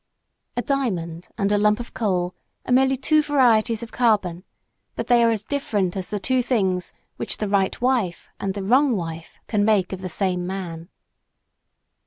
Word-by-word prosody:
A 245 - 0
diamond 180 - -2
and 200 -2 +1
a 205 - +3
lump 210 +1 +3
of 240 - -8
coal 180 -5 -1 0.3
are - - -4
merely 265 +1 +4
two 305 +4 +3
varieties 235 -6 +3
of 230 - -8
carbon; 200 -8 +1 0.5
but - - -3
they 240 -1 +4
are 230 - +5
as 220 -3 -1
different 205 -10 -1
as 190 -2 -4
the 205 - -2
two 255 +5 +2
things 190 -7 0 0.3
which - - -3
the 210 - -2
right 195 -1 +1
wife 240 -8 0
and 195 0 -2
the 200 - -4
wrong 255 +5 +4
wife 165 -3 -6
can 210 -2 0
make 205 -4 +2
of 190 - -6
the 185 - -4
same 180 0 -1
man. 175 -3 -6
205 Hz, 180 wpm, -23 LUFS, 185-245 Hz, 0.5 s, are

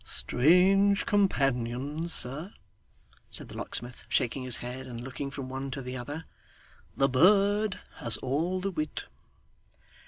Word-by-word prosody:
'Strange 190 +8 +3
companions, 140 - 0
sir,' 150 +10 -3 0.8
said - - -7
the - - -10
locksmith, 120 0 -1
shaking 125 +3 0
his 125 -3 +5
head, 125 +3 -7
and 120 -2 -7
looking 135 +2 -5
from 135 -1 -6
one 135 +1 -5
to 135 - -5
the 125 -1 -6
other. 145 +6 -6 0.7
'The 135 - +4
bird 200 +8 +4 0.2
has 115 -3 0
all 160 +8 -1
the 195 +2 -2
wit. 155 -3 -3
140 Hz, 130 wpm, -29 LUFS, 125-180 Hz, 0.8 s, his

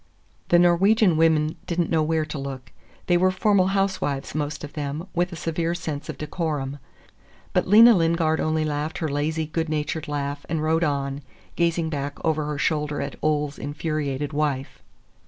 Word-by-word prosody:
…" - - -37
The 175 - +6
Norwegian 180 +2 +4
women 160 -1 +2
did 175 0 -2
n't 170 - 0
know 160 -2 +3
where 155 0 +1
to 150 -1 -6
look. 135 -2 -7 0.3
They 175 - +3
were 185 +2 +4
formal 190 0 +2
housewives, 170 -8 -1
most 150 0 -3
of 145 - -7
them, 150 +2 -4
with 175 +2 0
a - - -6
severe 165 +1 -2
sense 150 -4 -5
of - - -5
decorum. 150 -3 -3 0.7
But - - +1
Lena 225 +5 +8
Lingard 165 -3 +2
only 155 0 0
laughed 150 +1 -2
her 160 - -1
lazy, 155 +2 -1
good 160 +1 -2
natured 155 +1 -2
laugh 145 -1 -3
and 160 -2 -1
rode 160 +2 +2
on, 140 -2 -1 0.3
gazing 170 -1 +1
back 140 -1 -3
over 155 -2 +1
her 150 -1 -3
shoulder 150 -1 0
at - - -4
Ole's 150 -2 0
infuriated 145 -1 -3
wife. 145 -3 -2
155 Hz, 175 wpm, -24 LUFS, 145-170 Hz, 0.7 s, Lena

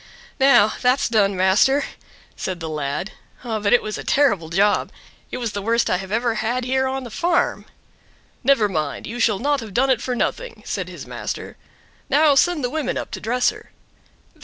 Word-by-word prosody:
"Now, 265 -6 +5
that's 255 +2 +2
done 205 -4 +2
master!" 190 +10 +3 0.5
said 185 -2 -4
the 165 - -5
lad; 150 +5 -3 0.3
"but 215 -4 -1
it 245 - +5
was 215 0 -4
a - - -6
terrible 205 - +2
job. 200 +4 +2 0.4
It - - -5
was 235 -3 -3
the 205 - -4
worst 230 +3 +1
I 180 - +2
have 190 +1 -8
ever 230 +2 +1
had 245 +3 -1
here 265 +1 +1
on 265 0 -3
the 240 - -9
farm. 340 +8 0 0.8
"Never 250 -5 +4
mind, 155 -7 -3
you 235 +3 -6
shall 220 -4 +2
not 285 +5 0
have 220 -5 -9
done 265 +2 +3
it 240 -3 +1
for 250 - -2
nothing," - - -3
said - - -3
his - - -9
master. - - -6 0.5
"Now 295 +2 +5
send 315 +2 +2
the 245 - -1
women 300 -4 -2
up - - -5
to - - -6
dress 245 +3 +1
her." - - -14
235 Hz, 190 wpm, -21 LUFS, 205-265 Hz, 0.8 s, Now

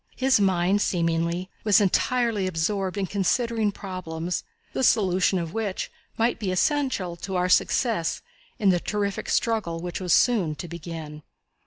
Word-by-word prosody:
His 265 -3 +3
mind, 190 0 +2
seemingly, 170 0 0 0.2
was 210 -1 +5
entirely 215 +1 +1
absorbed 185 +3 -1
in 200 - 0
considering 215 +4 0
problems, 180 -3 -4 0.3
the - - -1
solution 190 -4 +3
of 165 -2 -4
which 215 -4 -3 0.3
might 230 +2 +1
be 205 -4 -2
essential 205 - 0
to 190 +2 -5
our 180 0 +1
success 180 - +1 0.3
in 205 -4 +3
the 180 -2 +3
terrific 200 +1 -2
struggle 215 -8 0
which 175 +2 -5
was 180 -2 -2
soon 190 -11 +3
to 175 - -7
begin. 160 -2 -7
185 Hz, 145 wpm, -25 LUFS, 170-215 Hz, 0.3 s, was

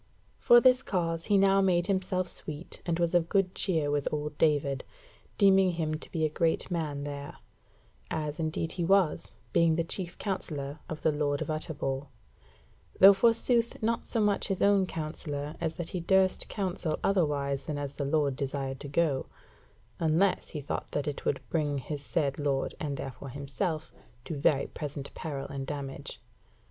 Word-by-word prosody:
For 240 - +7
this 255 +1 +5
cause 165 -6 -1
he 205 - +3
now 195 0 +5
made 175 -3 +3
himself 185 -1 0
sweet, 155 0 -6
and 165 -1 +1
was 170 0 +1
of 170 -1 +2
good 195 -2 +2
cheer 160 -7 +1
with 145 -1 0
old 150 0 -3
David, 145 -3 +2 0.5
deeming 195 -2 +5
him 160 -2 -1
to 155 - -7
be 160 -2 0
a - - +4
great 160 +3 0
man 150 -4 -2
there; 145 0 -6 0.7
as 150 -1 -3
indeed 160 0 -1
he 175 - -2
was, 190 -2 +2 0.2
being 165 -1 +4
the 165 - +1
chief 175 +1 -3
counsellor 150 -7 -4
of 155 - -6
the 160 - +4
Lord 145 -1 0
of - - -3
Utterbol; 145 -3 -3 0.9
though 195 +1 +10
forsooth 230 +2 +3
not 230 +1 0
so 230 - -1
much 210 -2 +2
his 195 -2 0 0.2
counsellor 155 -2 -4
as 165 -1 -1
that 175 -1 -4
he 180 - -3
durst 190 +2 +2
counsel 185 -5 -2
otherwise 145 -7 +1
than 150 - -3
as 145 -1 -4
the 145 - -4
Lord 140 -1 +1
desired 135 -1 -3
to 145 - -7
go; 145 -2 +1 0.7
unless 165 +4 +2
he 150 - -5
thought 140 - -4
that 145 0 -1
it 145 - -4
would 135 - -1
bring 150 -3 0
his 145 +2 -5
said 145 -1 -1
Lord, 140 -2 0
and 145 -3 -3
therefore 135 +1 -7
himself, 150 +4 -3 0.3
to - - -4
very 140 -1 +2
present 145 -2 -6
peril 140 -4 -5
and 135 -1 -5
damage. 140 -1 -6
155 Hz, 170 wpm, -29 LUFS, 145-180 Hz, 0.9 s, though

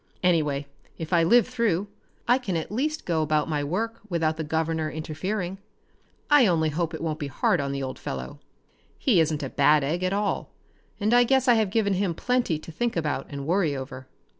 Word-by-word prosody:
Anyway, 150 -5 +2 0.3
if 160 +1 -5
I 170 - +5
live 235 +9 +5
through, 225 -7 0 0.4
I 250 +2 +4
can 190 -9 -2
at 160 - -5
least 305 +8 -2
go 165 -3 +1
about 155 -1 +1
my 150 -3 -1
work 225 +10 -2
without 160 -3 0
the 160 - -4
governor 160 0 -1
interfering. 175 +5 -4 0.7
I 290 -6 +6
only 160 -3 +2
hope 165 +2 -2
it 160 - -6
won't 155 -1 -2
be 145 - -3
hard 140 +4 +1
on 140 0 -2
the 140 0 -3
old 130 -1 -5
fellow. 65 -1 -6 0.6
He 225 -10 +3
isn't 155 -2 +1
a 135 - -3
bad 150 +1 +4
egg 160 +6 -1
at 185 - +1
all, 205 +1 -1 0.5
and 215 +2 +1
I 245 0 +7
guess 265 +1 +2
I 245 - +7
have 220 -3 +2
given 200 -1 +1
him 185 -3 0
plenty 245 -9 0
to 155 - -10
think 240 +8 -2
about 155 -3 -2
and 140 -1 -6
worry 170 -3 +1
over." 130 -1 -7
165 Hz, 205 wpm, -26 LUFS, 155-210 Hz, 0.7 s, I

